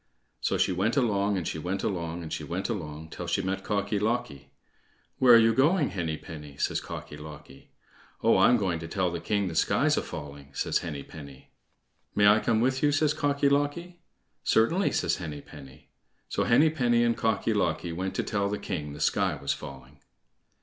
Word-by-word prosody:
So - - 0
she - - +2
went 100 +7 0
along, 100 -5 +1
and 90 - -3
she 80 - -3
went 90 +5 -3
along, 85 -2 -3
and 80 - -6
she - - -4
went 95 +5 -3
along 80 -7 -5
till 90 - -6
she 95 +3 0
met 95 +1 -2
Cocky 100 0 -1
locky. 100 - -2 0.7
"Where 125 -2 +8
are - - +10
you 115 0 +5
going, 150 +5 +3
Henny 80 -5 -2
penny?" 75 -4 -10
says - - -1
Cocky - - -8
locky. 75 -2 -12 0.5
"Oh! - - +5
I'm 120 - +6
going 95 -6 -1
to 80 - -7
tell 90 +1 -1
the 85 - -3
king 100 -2 0
the 85 - -4
sky's - - +2
a - - +2
falling," 70 -1 -9
says - - 0
Henny 75 -5 -5
penny. 70 -4 -12 0.6
"May 105 - +4
I 105 +2 +6
come 110 -1 +1
with 130 +2 +1
you?" 145 - +3
says 145 +1 +2
Cocky 145 -1 +1
locky. 145 +5 0 0.4
"Certainly," 165 - +2
says - - +1
Henny 75 -5 -6
penny. 70 -3 -14 0.4
So - - 0
Henny 150 +7 +5
penny 120 -6 +2
and 120 -1 +2
Cocky 110 -3 0
locky 85 - -1
went 95 +3 -3
to - - 0
tell 100 -2 -1
the 105 - -2
king 75 -9 -5
the 75 - -9
sky - - +1
was 70 - -1
falling. 70 0 -11
95 Hz, 195 wpm, -28 LUFS, 80-120 Hz, 0.7 s, are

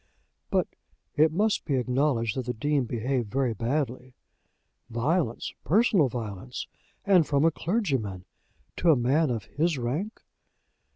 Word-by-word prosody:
"But - - +1 0.5
it 155 +1 +4
must 205 +6 +1
be 140 - -1
acknowledged 125 -2 +1
that 130 -2 -3
the 125 - -2
Dean 145 +3 0
behaved 120 0 -2
very 130 0 0
badly. 125 +2 -2 0.7
Violence! 120 +2 -1
personal 195 - +3
violence! 115 +1 -5 0.4
And 185 -6 +5
from 145 +1 +2
a 165 - +5
clergyman, 135 - -2 0.5
to 170 - +2
a 160 - +7
man 135 +5 +2
of 115 -4 -2
his 160 0 0
rank!" 145 - -3
135 Hz, 130 wpm, -27 LUFS, 120-160 Hz, 0.7 s, a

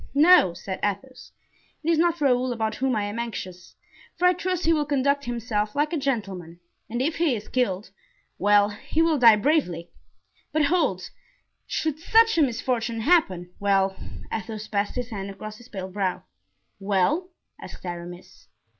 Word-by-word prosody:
"No," 295 - +6
said 190 +1 -6
Athos, 230 +6 -4 0.5
"it 320 - -1
is 320 - +2
not 340 0 +2
Raoul 255 -2 +2
about 220 -2 -1
whom 265 -2 0
I 210 - 0
am 205 +3 -4
anxious, 185 -6 -6 0.4
for 360 - +1
I 360 - +6
trust 365 0 -2
he 330 - +4
will 305 -2 +1
conduct 280 0 +1
himself 225 -3 -2
like 300 +3 0
a - - +1
gentleman; 195 - -3 0.3
and 240 +3 -1
if 310 +3 -1
he 325 -7 +2
is 210 -1 -7
killed—well, 205 -2 0
he 265 +10 -1
will 320 -3 +2
die 230 -3 +8
bravely; 210 - 0 0.6
but 310 -1 +2
hold—should 310 - -3
such 450 +6 +4
a - - +5
misfortune 240 -3 -1
happen—well—" 195 - +1 0.4
Athos 220 -1 -5
passed 205 -1 -1
his 250 -1 -3
hand 200 -2 -5
across 215 +2 -8
his 240 +2 -16
pale 190 -3 -5
brow. 190 -2 -2 0.6
"Well?" 205 - +1 0.3
asked - - -10
Aramis. 175 0 -8
230 Hz, 155 wpm, -25 LUFS, 200-295 Hz, 0.6 s, die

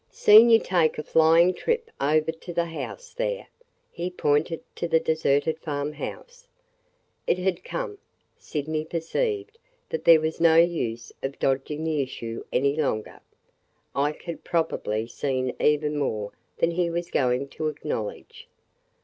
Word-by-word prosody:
"Seen 220 +3 +7
you 225 - +8
take 175 -7 +1
a 150 - -3
flying 165 +4 +5
trip 460 - -2
over 155 +3 +2
to 165 +2 -10
the 170 0 0
house 465 - -7
there!" - - -2 0.5
He 175 +1 -4
pointed 160 -1 0
to 170 - -2
the 160 - +3
deserted 160 0 +1
farm 145 -2 -3
house. - - -8 0.8
It - - +2
had 180 -1 -1
come! 465 -5 -5 0.4
Sydney 155 +1 -3
perceived 405 - -2 0.3
that 475 - -3
there 165 -1 +8
was 160 +1 -3
no 165 -1 +6
use 140 -10 +1
of 135 +1 -4
dodging 135 +3 -1
the 155 -3 0
issue 115 -4 -5
any 140 +2 +2
longer. 135 -9 -2 0.8
Ike 145 +2 -1
had 170 -1 -7
probably 110 -10 -1
seen 130 +1 -2
even 150 0 +2
more 105 -7 -2 0.3
than 165 - +2
he 170 0 0
was 170 +1 -3
going 125 +1 +1
to 155 +3 -3
acknowledge. 150 -8 -5
160 Hz, 145 wpm, -25 LUFS, 145-175 Hz, 0.8 s, you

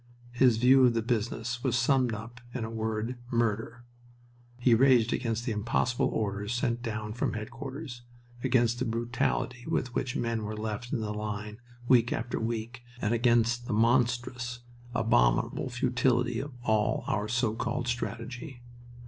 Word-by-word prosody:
His 120 -2 +4
view 130 +3 +6
of 120 -2 +5
the 115 - +1
business 115 +1 -2
was - - +2
summed 125 0 +3
up 115 +2 -7
in 125 - -2
the 110 - -4
word 110 +2 -2
"murder." 115 0 -1 0.7
He 125 -1 +4
raged 120 -1 +5
against 115 -1 -1
the 120 - -1
impossible 115 +3 +1
orders 105 +1 -2
sent 120 -1 0
down 110 -2 -4
from 125 - -1
headquarters, 125 +4 -6 0.4
against 120 -2 +2
the 130 - 0
brutality 120 +1 -1
with 125 -1 -1
which 130 -1 -2
men 115 -2 -1
were 105 0 -4
left 110 +3 -4
in 115 - -1
the 105 -1 -2
line 105 0 -5 0.3
week 120 -2 +5
after 120 +2 -2
week, 115 +2 -3 0.2
and 110 0 0
against 120 0 +2
the - - -1
monstrous, 120 +1 +1 0.3
abominable - - +2
futility 120 -1 +1
of 140 +1 -5
all 110 -2 +1
our 105 0 -1
so 115 0 +1
called 120 +2 -2
strategy. 120 +2 -4
120 Hz, 150 wpm, -29 LUFS, 110-125 Hz, 0.7 s, view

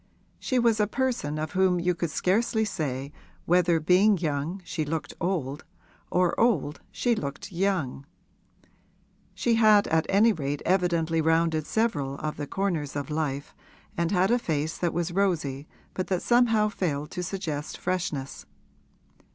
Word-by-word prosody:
She 255 - -1
was 230 -3 +3
a 210 - +3
person 235 - -1
of 155 +1 -3
whom 185 -1 +2
you 180 +1 +1
could 170 -1 -3
scarcely 220 +6 +1
say 140 -8 -3 0.3
whether 175 -1 +3
being 185 +6 +4
young 155 +2 -2
she 155 - -2
looked 150 -1 -4
old 155 -6 -2 0.5
or 180 -1 +2
old 185 - +1
she 245 - +1
looked 145 -1 -5
young; 170 -8 -1 1.3
she 240 - +1
had 210 -2 +6
at 160 0 +2
any 215 +3 +5
rate 145 -4 -3
evidently 170 -3 +1
rounded 160 -1 +1
several 150 -12 0
of 150 +2 -4
the 145 -1 -4
corners 170 -8 -2
of 145 0 -4
life 145 -2 -2 0.4
and 170 -1 0
had 190 +2 +2
a 245 - +3
face 155 -6 -2
that 175 -2 -1
was 175 +1 -2
rosy 160 -7 -1 0.3
but 185 - -3
that 185 -2 -1
somehow 230 -3 +4
failed 155 -7 -3
to 180 - -4
suggest 165 -5 -4
freshness. 155 -7 -3
170 Hz, 150 wpm, -27 LUFS, 150-195 Hz, 1.3 s, had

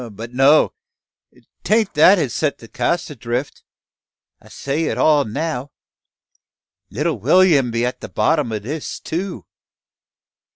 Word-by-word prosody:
But 115 +4 -9
no! 135 +4 +4 0.9
Tain't 215 -1 +1
that 180 +7 +6
has 140 -9 -1
set 150 -2 -1
the 115 - -14
cask 160 +8 -2
adrift. 125 +1 -4 0.8
I - - -18
set 140 +2 -4
it 165 - -1
all 150 -3 +3
now. 145 +3 -4 1.2
Little 150 +8 -2
Will'm 170 -9 +4
be 115 +1 -1
at 125 - -4
the - - -8
bottom 150 -7 0
o' 110 - -2
this 140 +9 -6
too. 180 +3 -5
145 Hz, 130 wpm, -19 LUFS, 125-165 Hz, 1.2 s, that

